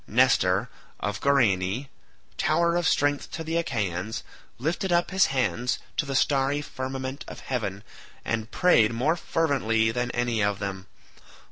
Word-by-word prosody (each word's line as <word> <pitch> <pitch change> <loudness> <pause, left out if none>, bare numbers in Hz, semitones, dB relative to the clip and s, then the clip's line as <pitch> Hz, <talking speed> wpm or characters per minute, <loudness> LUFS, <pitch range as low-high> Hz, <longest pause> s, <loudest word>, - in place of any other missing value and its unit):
Nestor 110 -4 +3 0.3
of 105 +1 -3
Gerene, 120 -3 +2 0.5
tower 170 +2 +2
of 175 -1 +1
strength 145 0 +1
to 160 - -4
the 160 +1 -3
Achaeans, 110 - -2 0.3
lifted 170 +8 -1
up 175 +1 +2
his 190 -1 +4
hands 125 -2 0 0.2
to 150 - -1
the 135 - -2
starry 140 +1 +2
firmament 130 0 -5
of - - -9
heaven, 105 -6 -3 0.4
and 115 -1 -2
prayed 120 -10 +4
more 140 +8 +1
fervently 130 -10 +1
than 125 +1 -1
any 120 -3 0
of 100 -1 +1
them. 95 -1 -5
130 Hz, 140 wpm, -26 LUFS, 110-145 Hz, 0.5 s, his